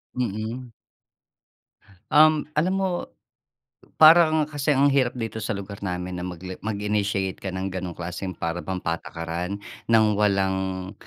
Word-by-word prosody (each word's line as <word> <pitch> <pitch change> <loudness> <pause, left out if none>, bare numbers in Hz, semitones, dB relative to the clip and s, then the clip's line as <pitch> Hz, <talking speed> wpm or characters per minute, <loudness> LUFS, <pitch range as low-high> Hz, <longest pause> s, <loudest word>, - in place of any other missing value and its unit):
Mm. 120 +1 -3 1.4
Um, 155 0 +5
alam 175 +5 +2
mo 180 -2 -1 0.9
parang 160 -1 +7
kasi 145 -1 -3
ang 140 - +5
hirap 130 -2 +1
dito 110 -1 -4
sa 105 -1 -2
lugar 100 +1 -8
namin 90 -1 -4
na - - -5
mag 90 -1 -6
le 95 - -5
mag-initiate 105 -2 -1
ka 95 - -3
ng 95 0 -4
ganong 90 -2 -5
klaseng 90 +1 -5
para 85 +1 -3
bang 95 -1 -4
patakaran 85 +2 -4 0.3
ng 110 -1 +6
walang, 95 -2 0
100 Hz, 135 wpm, -24 LUFS, 95-125 Hz, 1.4 s, parang